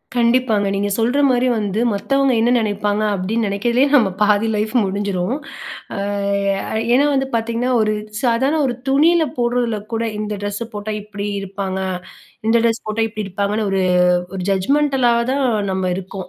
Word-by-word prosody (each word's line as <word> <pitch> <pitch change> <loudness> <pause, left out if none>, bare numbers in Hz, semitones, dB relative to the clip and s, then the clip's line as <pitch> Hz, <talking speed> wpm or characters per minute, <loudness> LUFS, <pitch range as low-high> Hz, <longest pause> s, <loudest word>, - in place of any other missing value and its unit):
கண்டிப்பாங்க. 235 -3 +2
நீங்க 205 +1 -1
சொல்ற 240 +5 +1
மாரி 250 0 +2
வந்து, 205 0 -2
மத்தவங்க 275 +7 +1
என்ன 230 - +3
நினைப்பாங்க, 210 -1 0
அப்டின்னு 215 +5 -1
நினைக்கவே 235 +6 +1
நம்ம 230 -8 +4
பாதி 210 +1 +3
லைஃப் 215 +1 -1
முடிஞ்சிரும். 195 +2 -2 0.6
அ - - -4 1.0
ஏன்னா 275 +4 +4
வந்து 270 -1 0
பாத்தீங்கன்னா, 230 +2 -1
ஒரு 215 0 +1 0.3
சாதாரண, 265 +5 +1
ஒரு 250 - -1
துணியில 315 +5 +4
போடுறதுல 240 -2 0 0.2
கூட, 225 0 0 0.2
இந்த 210 0 -3
ட்ரெஸ்ஸ 205 +3 -3
போட்டா 210 +1 -4
இப்டி 205 0 -6
இருப்பாங்க, 195 -1 -4 0.7
இந்த 225 - +3
ட்ரெஸ் 230 -1 +1
போட்டா 215 +1 0
இப்டி 215 -1 -5
இருப்பாங்கன்னு, 200 +2 -1
ஒரு 195 0 +1 0.6
ஒரு 185 - -4
ஜட்ஜ்மெண்டலா 265 +5 +2 0.2
தான் 275 0 0 0.3
நம்ம 190 -1 -1
இருக்கோம். 190 -1 -7
220 Hz, 145 wpm, -19 LUFS, 200-245 Hz, 1.0 s, நம்ம